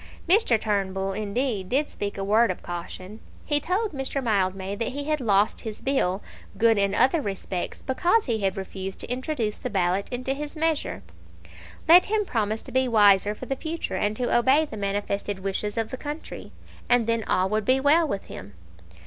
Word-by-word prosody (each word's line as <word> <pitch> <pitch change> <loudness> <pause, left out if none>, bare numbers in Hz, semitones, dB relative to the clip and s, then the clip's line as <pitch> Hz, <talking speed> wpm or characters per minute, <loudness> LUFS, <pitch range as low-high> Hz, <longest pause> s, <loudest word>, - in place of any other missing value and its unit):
Mr. 345 - +4
Turnbull, 195 -2 -1
indeed, 210 -1 -2
did 285 +3 +1
speak 200 0 -5
a 195 - -3
word 215 +3 +3
of 185 - -4
caution. 185 +4 -7 0.3
He 295 -1 +2
told 380 +8 -1
Mr. 275 -1 -3
Mildmay 195 -5 0
that 230 - -1
he 285 +1 -3
had 305 -1 -1
lost 205 -2 +2
his 220 -2 -6
bill, 210 -8 0 0.3
good 225 -2 +4
in 200 0 +1
other 265 +8 +3
respects, 195 -4 -4
because 350 +11 +2
he 230 -4 -1
had 195 -2 -1
refused 190 0 -5
to - - -5
introduce 250 -4 -2
the - - -4
ballot 190 0 0
into 255 +1 -2
his 295 +2 -6
measure. 320 -1 -1 0.8
Let 350 +3 +8
him 425 0 +1
promise 220 - -1
to - - -9
be 260 +1 +2
wiser 205 -2 +4
for 255 - -8
the 270 - -2
future, 320 +4 -4
and 210 +1 0
to 245 +1 0
obey 265 +6 +4
the 290 - -9
manifested 200 -1 -2
wishes 200 +2 -2
of 225 -1 -1
the 260 - -4
country, 295 +3 -7 0.4
and 245 -2 +4
then 230 0 0
all 185 +1 +2
would 215 +1 0
be 255 +4 +3
well 305 +4 +4
with 200 -8 -3
him. 100 - -10
225 Hz, 190 wpm, -25 LUFS, 200-275 Hz, 0.8 s, Let